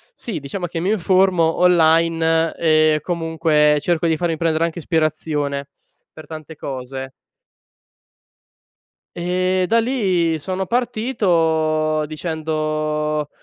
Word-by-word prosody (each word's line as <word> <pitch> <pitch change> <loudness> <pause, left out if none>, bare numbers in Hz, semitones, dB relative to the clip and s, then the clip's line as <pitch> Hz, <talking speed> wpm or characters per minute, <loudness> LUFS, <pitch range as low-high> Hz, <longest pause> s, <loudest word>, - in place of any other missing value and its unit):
sì, 215 - -5
diciamo 150 +6 -5
che 165 -1 -4
mi 185 - 0
informo 185 -4 +2
online, 165 -1 +3
e 155 -1 +3
comunque 160 -3 +1
cerco 170 +2 0
di 160 - +1
farmi 165 0 -1
prendere 165 0 +1
anche 170 +1 -4
ispirazione, 155 -3 -1 0.4
per 155 - -12
tante 155 0 -9
cose. 130 0 -6 2.0
E 185 +1 0
da 230 +3 +3
lì 185 -10 0
sono 190 +4 -3
partito, 165 -10 0
dicendo 155 -1 -2
160 Hz, 105 wpm, -20 LUFS, 155-180 Hz, 2.0 s, online